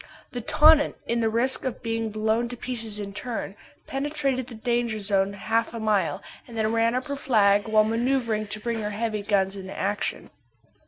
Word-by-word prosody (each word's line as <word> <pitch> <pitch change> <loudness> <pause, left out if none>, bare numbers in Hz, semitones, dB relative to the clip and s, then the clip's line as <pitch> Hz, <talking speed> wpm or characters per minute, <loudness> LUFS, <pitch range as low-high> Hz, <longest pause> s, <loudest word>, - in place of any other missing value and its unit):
The 245 - -4
Tonnant, 300 +4 +5
at 235 0 +1
the 225 - +2
risk 240 +4 +1
of 260 -3 -4
being 225 -1 -1
blown 220 +2 0
to 245 - -7
pieces 225 -4 -4
in 200 -1 -5
turn, 220 -2 -5 0.3
penetrated 275 -2 -1
the 240 - -9
danger 235 -1 -1
zone 200 -1 +1
half 225 +4 -1
a - - -4
mile, 200 -9 0 0.2
and 235 -2 -9
then 220 0 +1
ran 230 +1 +2
up 255 - -1
her 285 -1 -3
flag 210 -6 +3
while 215 0 +5
manoeuvring 230 -1 0
to 215 +1 -5
bring 230 0 -2
her 210 - -2
heavy 215 0 -2
guns 200 -1 +1
into 190 -1 -8
action. 205 +2 -2
225 Hz, 190 wpm, -26 LUFS, 210-240 Hz, 0.3 s, Tonnant